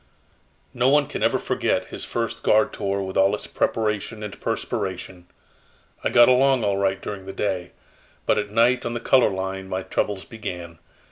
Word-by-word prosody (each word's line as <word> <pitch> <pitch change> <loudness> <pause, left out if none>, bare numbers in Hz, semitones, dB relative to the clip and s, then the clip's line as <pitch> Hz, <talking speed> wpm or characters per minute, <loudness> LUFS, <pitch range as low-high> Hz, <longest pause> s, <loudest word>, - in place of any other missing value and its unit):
"No 125 +1 +3
one 145 +1 +4
can 145 - -6
ever - - +3
forget - - -1
his - - -7
first 115 -1 -3
guard 110 0 +3
tour 100 0 -2
with 95 0 -4
all 95 +2 +4
its - - -8
preparation 105 0 -1
and 105 -2 -7
perspiration. 90 -1 -4 0.8
I - - +1
got 120 0 +7
along 130 -1 +4
all 100 -1 +1
right 95 -1 +1
during 95 -1 -7
the 95 - -6
day, 95 -3 -2 0.5
but - - +3
at 105 -1 -3
night 120 +4 +3
on 120 0 -3
the - - -1
color 130 +1 +4
line 95 0 -4
my 95 0 -2
troubles 100 0 -2
began. 90 -7 -7
105 Hz, 180 wpm, -24 LUFS, 95-115 Hz, 0.8 s, got